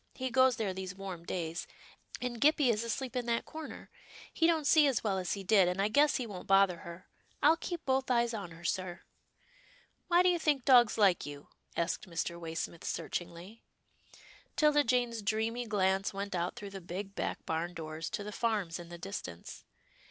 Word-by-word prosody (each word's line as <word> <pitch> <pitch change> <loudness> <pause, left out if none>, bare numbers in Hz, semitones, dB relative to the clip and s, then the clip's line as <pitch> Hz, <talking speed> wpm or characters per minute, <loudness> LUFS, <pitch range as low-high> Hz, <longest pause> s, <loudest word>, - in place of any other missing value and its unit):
He 260 -1 -3
goes 260 0 +5
there 210 -4 -2
these 185 -1 -6
warm 190 -3 -7
days, 170 -1 -3 0.5
and 245 -2 -4
Gippie 290 -3 +5
is 220 0 -1
asleep 250 +3 -3
in 245 -1 -2
that 235 0 0
corner. 315 -1 -9 0.4
He 325 - +3
don't 320 -3 +2
see 295 0 +6
as 265 -5 0
well 195 -3 0
as 180 -2 -2
he 200 - -5
did, 190 -1 +5
and 180 +2 -1
I 200 +2 +2
guess 290 +6 +4
he 250 - -1
won't 195 -5 -8
bother 195 -2 +5
her. 170 +2 -10 0.4
I'll 310 +3 +7
keep 335 0 -5
both 265 0 +1
eyes 235 -1 +2
on 200 -5 -5
her, 165 +1 -13
sir." 175 -1 -2 0.6
" - - -31
Why 350 +1 +5
do 365 - +5
you 350 -1 +2
think 290 -5 +1
dogs 245 -5 +6
like 195 -8 +3
you? 145 0 -9
" - - -20
asked 170 +2 -1
Mr. 170 0 -3
Waysmith, 165 0 -5
searchingly. 175 +5 -5 0.9
'Tilda 300 -1 +4
Jane's 240 -2 +1
dreamy 225 +3 -1
glance 195 -1 +1
went 200 0 -4
out 175 0 -1
through 200 -1 -8
the 195 -1 -7
big 190 +3 -6
back - - -3
barn 170 +2 -2
doors, 160 0 -5
to 205 - -4
the 210 - -6
farms 205 -7 -1
in 170 -1 -9
the 175 - -8
dis 195 +4 -5
tance. 85 -1 -10
205 Hz, 200 wpm, -32 LUFS, 175-250 Hz, 0.9 s, I'll